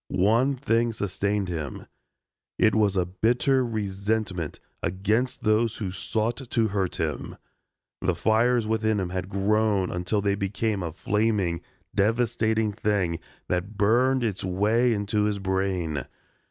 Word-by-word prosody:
One 115 Hz, +9 st, +3 dB
thing 115 Hz, -3 st, +1 dB
sustained 100 Hz, -1 st, -1 dB
him. 80 Hz, -6 st, -5 dB, 0.7 s
It 110 Hz, -, +4 dB
was 105 Hz, -3 st, +2 dB
a 90 Hz, -, +2 dB
bitter 120 Hz, +8 st, +2 dB
resentment 100 Hz, -5 st, -2 dB, 0.2 s
against 105 Hz, +8 st, 0 dB
those 110 Hz, +1 st, +2 dB
who 100 Hz, -5 st, -3 dB
sought 110 Hz, +4 st, -1 dB
to 120 Hz, -4 st, 0 dB
hurt 95 Hz, -3 st, -1 dB
him. 75 Hz, -3 st, -3 dB, 0.6 s
The -, -, +1 dB
fires 115 Hz, +1 st, +2 dB
within 110 Hz, -1 st, +1 dB
him 90 Hz, -2 st, -2 dB
had 90 Hz, 0 st, -4 dB
grown 100 Hz, -1 st, +1 dB
until 90 Hz, +4 st, -1 dB
they 100 Hz, 0 st, +1 dB
became 100 Hz, +1 st, -1 dB
a 85 Hz, -2 st, -3 dB
flaming, 100 Hz, -1 st, 0 dB, 0.3 s
devastating 110 Hz, 0 st, +1 dB
thing 95 Hz, -5 st, 0 dB, 0.3 s
that 95 Hz, +4 st, -2 dB
burned 125 Hz, +5 st, +3 dB
its 105 Hz, -5 st, -2 dB
way 105 Hz, +7 st, +2 dB
into 105 Hz, 0 st, 0 dB
his 105 Hz, -1 st, 0 dB
brain. 95 Hz, -6 st, -1 dB
105 Hz, 130 wpm, -26 LUFS, 95-110 Hz, 0.7 s, It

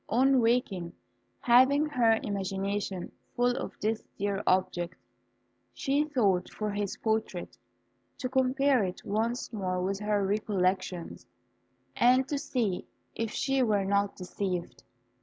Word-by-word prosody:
On 260 Hz, +2 st, +4 dB
waking, 220 Hz, -7 st, 0 dB, 0.5 s
having 260 Hz, +5 st, +5 dB
her 235 Hz, -7 st, +3 dB
imagination 195 Hz, -1 st, -3 dB, 0.2 s
full 245 Hz, 0 st, +2 dB
of -, -, -6 dB
this 220 Hz, +1 st, -1 dB
dear 200 Hz, 0 st, -1 dB
object, 180 Hz, -2 st, +1 dB, 0.8 s
she 290 Hz, +2 st, 0 dB
sought 200 Hz, -10 st, +2 dB
for 210 Hz, -1 st, -3 dB
his 205 Hz, -1 st, -3 dB
portrait, 220 Hz, -5 st, -2 dB, 0.6 s
to 255 Hz, -, -2 dB
compare 260 Hz, -1 st, +2 dB
it 185 Hz, -1 st, -5 dB
once 230 Hz, +4 st, -1 dB
more 185 Hz, -3 st, -2 dB
with 195 Hz, +2 st, -1 dB
her 210 Hz, -1 st, 0 dB
recollections, 190 Hz, -3 st, -1 dB, 0.7 s
and 255 Hz, +2 st, +4 dB
to 285 Hz, -, -1 dB
see 225 Hz, -10 st, -2 dB, 0.3 s
if 225 Hz, -1 st, -2 dB
she 270 Hz, +4 st, 0 dB
were 210 Hz, -5 st, +2 dB
not 200 Hz, 0 st, +1 dB
deceived. 180 Hz, -, -4 dB
210 Hz, 120 wpm, -29 LUFS, 190-250 Hz, 0.8 s, having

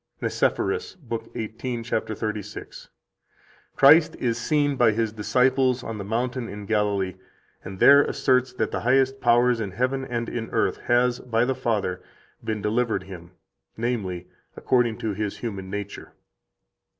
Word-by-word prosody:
101 -, -, -2 dB
NICEPHORUS, 445 Hz, +1 st, -1 dB
lib. 115 Hz, -, -4 dB
18, 115 Hz, +2 st, -4 dB
cap. 110 Hz, -1 st, -2 dB
36: 105 Hz, -1 st, -6 dB, 0.9 s
"Christ 155 Hz, +4 st, +6 dB
is 120 Hz, -2 st, -1 dB
seen 145 Hz, -1 st, +1 dB
by 120 Hz, -4 st, +4 dB
His 110 Hz, 0 st, -1 dB
disciples 125 Hz, +3 st, +2 dB
on 110 Hz, -2 st, -5 dB
the -, -, -4 dB
mountain 120 Hz, +3 st, -2 dB
in 105 Hz, 0 st, -8 dB
Galilee, 100 Hz, -3 st, 0 dB, 0.5 s
and 95 Hz, 0 st, -8 dB
there 140 Hz, +8 st, +8 dB
asserts 130 Hz, -3 st, +1 dB
that 110 Hz, -3 st, -2 dB
the -, -, -2 dB
highest 135 Hz, +2 st, +2 dB
power 120 Hz, +1 st, +4 dB
in 115 Hz, -4 st, -2 dB
heaven 130 Hz, +7 st, -1 dB
and 120 Hz, -2 st, -3 dB
in 115 Hz, -1 st, -4 dB
earth -, -, 0 dB
has, 120 Hz, 0 st, +3 dB
by 120 Hz, -1 st, 0 dB
the 130 Hz, -, 0 dB
Father, 105 Hz, -7 st, -2 dB, 0.4 s
been 110 Hz, -2 st, -3 dB
delivered 110 Hz, -2 st, 0 dB
Him, 90 Hz, -2 st, -11 dB, 0.4 s
namely, 105 Hz, -7 st, -2 dB, 0.3 s
according 120 Hz, -3 st, +1 dB
to 110 Hz, -2 st, -3 dB
His 105 Hz, 0 st, -3 dB
human 100 Hz, -5 st, -5 dB
nature." 100 Hz, +1 st, -6 dB
115 Hz, 150 wpm, -24 LUFS, 105-125 Hz, 0.9 s, there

